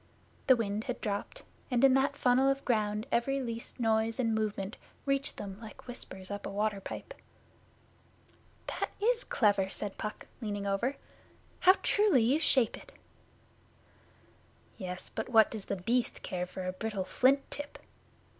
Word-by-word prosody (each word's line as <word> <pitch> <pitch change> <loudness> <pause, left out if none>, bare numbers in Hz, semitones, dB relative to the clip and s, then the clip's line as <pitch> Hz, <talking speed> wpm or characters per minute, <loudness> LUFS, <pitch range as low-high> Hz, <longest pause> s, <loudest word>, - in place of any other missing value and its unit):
The 260 - +8
wind 215 -2 -2
had 250 - -3
dropped, 205 -2 -3 0.3
and 250 -1 +2
in 270 -1 +7
that 275 +2 +2
funnel 255 +2 +4
of 275 0 -1
ground 215 -2 +1
every 270 +4 +1
least 235 -2 -5
noise 225 0 +1
and 230 -3 +2
movement 215 -1 -2 0.3
reached 275 0 0
them 195 -1 -6
like 220 -2 -11
whispers 190 -6 -7
up 205 0 -4
a - - -4
water 205 0 -1
Pipe. - - -7 1.5
'That - - -2
is 475 +3 +2
clever,' 200 -4 +2
said 200 0 -5
Puck, 215 - -5 0.2
leaning 205 -2 -3
over. 200 +8 0 0.6
'How 370 +1 +7
truly 410 - +4
you 265 +7 +3
shape 260 -7 +3
it!' - - -14 1.8
'Yes, 180 -1 -6
but - - -4
what 225 -3 +6
does 215 -3 -5
The - - -2
Beast 230 +6 0
care 180 -1 -3
for 185 +1 -6
a 185 - -2
brittle 200 -1 -3
flint 270 +7 +3
tip? 290 0 -6
225 Hz, 155 wpm, -31 LUFS, 200-260 Hz, 1.8 s, The